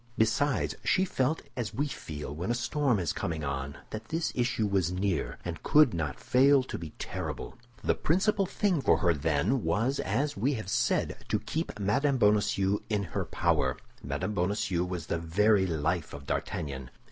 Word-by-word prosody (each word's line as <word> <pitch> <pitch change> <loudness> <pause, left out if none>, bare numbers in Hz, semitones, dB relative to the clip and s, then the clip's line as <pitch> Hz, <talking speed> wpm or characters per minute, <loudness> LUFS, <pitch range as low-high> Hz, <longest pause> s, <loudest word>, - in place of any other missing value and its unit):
Besides, 115 +6 +2
she 190 - +3
felt 150 -2 0
as 120 -5 -3
we 145 - +1
feel 75 - -6
when 85 +7 -4
a 120 - +2
storm 125 +1 +1
is 85 -5 -1
coming 80 -2 -3
on—that 70 +10 -5
this 165 +1 -1
issue 125 -2 0
was 95 -4 +1
near, 95 0 -1
and - - -4
could 150 -6 +5
not 75 -5 -3
fail 135 +1 +4
to 125 - -6
be 80 -2 -6
terrible. - - -5 0.3
The - - +3
principal 195 +4 +1
thing 185 -6 +1
for - - +4
her, 85 -3 +3
then, 80 - +1
was, 125 +6 +1
as 135 +9 0
we 130 +8 +1
have 110 -5 -5
said, - - +1
to - - +2
keep 160 -8 -3
Mme. 135 +8 +2
Bonacieux 105 -2 +3
in 105 -2 +1
her - - -1
power. - - +1 0.2
Mme. 70 +8 -3
Bonacieux 90 -2 0
was 90 -3 -4
the 85 - -1
very 95 +4 +3
life 80 0 -1
of 70 -1 -10
D'Artagnan. 65 -3 -3
105 Hz, 170 wpm, -29 LUFS, 85-130 Hz, 0.3 s, could